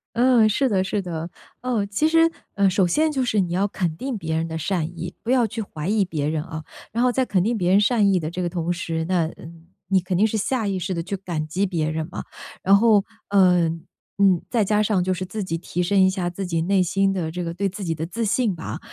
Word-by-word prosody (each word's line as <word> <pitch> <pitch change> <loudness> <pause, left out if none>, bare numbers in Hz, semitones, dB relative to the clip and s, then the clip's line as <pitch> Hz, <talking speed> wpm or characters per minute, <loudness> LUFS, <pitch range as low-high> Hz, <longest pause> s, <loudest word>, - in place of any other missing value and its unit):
嗯， 240 -2 +5
是 255 +5 +1
的 190 -4 +2
是 195 +2 -1
的， 170 -2 -5 0.3
呃， 245 -5 0
其 205 +10 +1
实， 330 +1 +4 0.2
呃， 200 -1 +3
首 190 0 +2
先 310 - +2
就 265 -3 0
是 215 -3 +1
你 180 -3 0
要 190 +3 +1
肯 175 -5 -2
定 265 +3 -3
别 160 -6 -3
人 165 +1 -1
的 160 0 -4
善 175 0 -1
意， 175 +1 -5
不 235 - -1
要 245 -3 +4
去 225 +1 -5
怀 155 -4 -6
疑 205 -1 +2
别 150 -4 -2
人 155 -1 -1
啊。 160 -2 -7 0.3
然 235 +3 0
后 250 - +4
在 260 +1 +1
肯 185 -6 +1
定 230 +2 0
别 180 -2 +1
人 200 +2 +5
善 210 -3 +3
意 185 - +3
的 155 -1 -3
这 180 +2 -4
个 - - 0
同 170 -1 -2
时， 165 -2 -2
那， 175 -2 +1
呃， 160 - -9 0.4
你 190 -1 +3
肯 180 +1 -3
定 200 +5 +4
是 220 0 -2
下 225 0 -1
意 195 - -1
识 185 +1 -3
地 170 - -2
去 190 +3 -4
感 170 -5 -4
激 185 +6 0
别 165 -5 -1
人 160 0 -3
嘛， - - -5 0.4
然 195 +1 +5
后， 215 -2 +4 0.3
嗯， 180 -4 +3 0.3
嗯， 190 -3 +5
再 230 -3 +2
加 210 +1 +2
上 200 -4 +1
就 185 0 0
是 185 +1 -4
自 200 +3 -4
己 165 -2 -2
提 175 +1 -3
升 195 +2 +2
一 190 - +6
下 180 -2 -2
自 190 +2 -5
己 165 -2 -1
内 190 +2 +2
心 195 +2 +1
的 170 -4 -2
这 180 +1 -4
个 170 - -3
对 200 +2 0
自 200 +2 -6
己 165 -3 -1
的 160 +1 -3
自 230 +7 -4
信 215 -2 +1
吧， 160 - -6
190 Hz, 280 characters per minute, -23 LUFS, 170-210 Hz, 0.4 s, 一